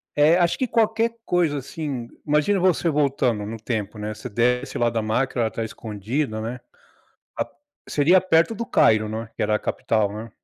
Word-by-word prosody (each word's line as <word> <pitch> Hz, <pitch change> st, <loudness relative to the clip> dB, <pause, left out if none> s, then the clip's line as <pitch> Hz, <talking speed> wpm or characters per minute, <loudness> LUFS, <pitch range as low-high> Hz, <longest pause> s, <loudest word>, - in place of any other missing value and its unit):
É, 155 Hz, +4 st, +5 dB
acho 175 Hz, -1 st, +2 dB
que 255 Hz, -, +1 dB
qualquer 230 Hz, 0 st, +1 dB
coisa 170 Hz, -5 st, +1 dB
assim, 135 Hz, -3 st, -5 dB, 0.2 s
imagina 150 Hz, +7 st, +2 dB
você 180 Hz, -1 st, +2 dB
voltando 135 Hz, -8 st, +1 dB
no 115 Hz, +1 st, -5 dB
tempo, 110 Hz, -2 st, -4 dB
né, 105 Hz, +1 st, -4 dB
você 105 Hz, -, -8 dB
desce 125 Hz, +4 st, 0 dB
lá 120 Hz, -1 st, +2 dB
da 115 Hz, -1 st, -1 dB
máquina, 120 Hz, +4 st, 0 dB
ela 110 Hz, -, +1 dB
tá 115 Hz, -, -4 dB
escondida, 110 Hz, +3 st, -3 dB
né, 115 Hz, +3 st, -4 dB, 0.8 s
a -, -, 0 dB, 0.4 s
seria 160 Hz, +6 st, +4 dB
perto 180 Hz, +3 st, +3 dB
do 235 Hz, -, -3 dB
Cairo, 110 Hz, -, +3 dB
não 110 Hz, +1 st, -4 dB
é? 110 Hz, -, -17 dB
Que -, -, -2 dB
era 105 Hz, 0 st, +1 dB
a 105 Hz, -, +2 dB
capital, 110 Hz, -3 st, 0 dB
né? 110 Hz, +2 st, -7 dB
125 Hz, 190 wpm, -23 LUFS, 110-165 Hz, 0.8 s, É